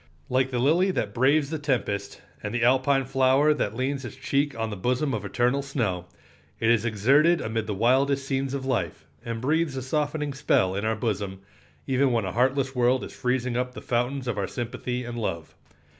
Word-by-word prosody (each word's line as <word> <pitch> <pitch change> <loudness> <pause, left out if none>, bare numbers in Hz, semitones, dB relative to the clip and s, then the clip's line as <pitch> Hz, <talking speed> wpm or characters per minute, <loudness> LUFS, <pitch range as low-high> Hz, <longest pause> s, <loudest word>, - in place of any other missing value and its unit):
Like 130 +1 +2
the 125 - -2
lily 160 +10 +3
that 185 - -2
braves 140 +4 +2
the 160 - -2
tempest, 115 -8 -2 0.2
and 105 +3 -4
the 120 - +1
"Alpine 130 +2 +3
flower 135 +3 +3
that 110 -7 -2
leans 135 +2 -2
its 120 - -7
cheek 140 0 -1
on 110 -1 -2
the - - -4
bosom 125 +8 0
of 105 -3 -2
eternal 125 +6 +1
snow," 110 -11 -2 0.5
it 115 +1 +3
is 115 -1 +2
exerted 135 - +4
amid 110 -1 -2
the 105 - -2
wildest 135 +5 +2
scenes 135 0 -1
of 135 -1 -4
life, 105 - -2 0.2
and 115 -1 -4
breathes 150 +2 0
a 130 - -3
softening 150 +1 -1
spell 95 -9 +2
in 100 +2 -2
our 110 0 +1
bosom, 100 -4 -3 0.4
even 135 0 +2
when 115 -4 +1
a 95 - -3
heartless 135 +2 +1
world 125 0 +2
is - - -8
freezing 125 -1 -1
up 125 0 -2
the - - -6
fountains 125 +2 -1
of 115 -4 -1
our 100 - -1
sympathy 125 +1 -4
and 120 0 -5
love. 85 -7 -4
125 Hz, 200 wpm, -26 LUFS, 115-140 Hz, 0.5 s, exerted